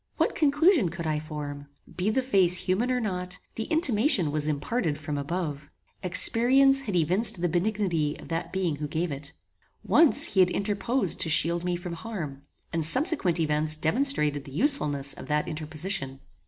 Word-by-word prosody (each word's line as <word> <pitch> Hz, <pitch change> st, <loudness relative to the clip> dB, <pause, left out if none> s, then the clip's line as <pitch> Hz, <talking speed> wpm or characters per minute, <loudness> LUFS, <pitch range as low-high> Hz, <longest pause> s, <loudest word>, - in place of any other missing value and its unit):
What -, -, +1 dB
conclusion 300 Hz, -, +2 dB
could 170 Hz, 0 st, -7 dB
I 155 Hz, -1 st, -1 dB
form? 145 Hz, -2 st, -7 dB, 0.3 s
Be 185 Hz, +3 st, -1 dB
the 260 Hz, +4 st, 0 dB
face 190 Hz, -8 st, +4 dB
human 185 Hz, +7 st, -1 dB
or 250 Hz, -1 st, 0 dB
not, 180 Hz, -4 st, -4 dB, 0.2 s
the 225 Hz, -, -4 dB
intimation 245 Hz, -, +2 dB
was 150 Hz, 0 st, 0 dB
imparted 155 Hz, +2 st, -2 dB
from 150 Hz, -1 st, -5 dB
above. 150 Hz, 0 st, -4 dB, 0.3 s
Experience 255 Hz, +9 st, +4 dB
had 210 Hz, -8 st, -4 dB
evinced 180 Hz, +5 st, +2 dB
the 175 Hz, -, 0 dB
benignity 175 Hz, -4 st, -1 dB
of -, -, -13 dB
that 165 Hz, +1 st, -4 dB
being 180 Hz, -6 st, -2 dB
who 150 Hz, 0 st, -5 dB
gave 160 Hz, +3 st, -3 dB
it. 140 Hz, +1 st, -8 dB, 0.5 s
Once 325 Hz, -3 st, +4 dB
he 195 Hz, -, +1 dB
had 180 Hz, -1 st, +5 dB
interposed 205 Hz, +2 st, -2 dB
to 165 Hz, -, 0 dB
shield 170 Hz, +2 st, +1 dB
me 180 Hz, 0 st, -1 dB
from 175 Hz, 0 st, -7 dB
harm, 165 Hz, -8 st, -7 dB, 0.3 s
and 165 Hz, -1 st, -1 dB
subsequent 255 Hz, -, +3 dB
events 155 Hz, 0 st, 0 dB
demonstrated 155 Hz, -, +1 dB
the 135 Hz, -, -10 dB
usefulness 150 Hz, -, +1 dB
of -, -, -11 dB
that 150 Hz, 0 st, -1 dB
interposition. 155 Hz, -2 st, -3 dB
175 Hz, 170 wpm, -26 LUFS, 150-220 Hz, 0.5 s, had